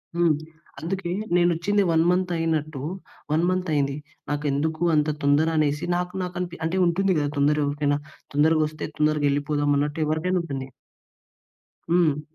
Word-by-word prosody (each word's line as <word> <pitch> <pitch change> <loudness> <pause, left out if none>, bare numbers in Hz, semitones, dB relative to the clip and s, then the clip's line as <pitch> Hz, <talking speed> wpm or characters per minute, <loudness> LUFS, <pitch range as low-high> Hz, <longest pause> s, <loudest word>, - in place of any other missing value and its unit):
హ్మ్. 170 -1 +3 0.5
అందుకే 175 +3 -3 0.2
నేను 175 0 +4
వచ్చింది. 200 +5 +1
1 160 0 +4
మంత్ 180 0 +1
అయినట్టు, 155 -3 -1 0.5
1 155 +2 +2
మంత్ 185 -1 -1
అయింది. 140 -1 +1 0.3
నాకు 145 0 -2
ఎందుకు 155 +3 -1
అంత 150 0 +2
తొందర 145 +3 +3
అనేసి 150 +1 +1
నాకు 180 0 -2
నాకు 180 -1 -6 0.3
అంటే 165 +3 -1
ఉంటుంది 190 +3 +1
గదా 145 -1 0
తొందర 145 +1 +3
ఎవరికైనా. 145 0 0 0.4
తొందరగొస్తే 155 0 +2
తొందరగా 150 -1 +2
ఎళ్ళిపోదాం 145 0 0
అన్నట్టు 145 +3 -1
ఎవరికైనా 160 +4 0
ఉంటుంది. 135 -5 -5 1.2
హ్మ్. 165 -4 +3
155 Hz, 140 wpm, -24 LUFS, 145-175 Hz, 1.2 s, నేను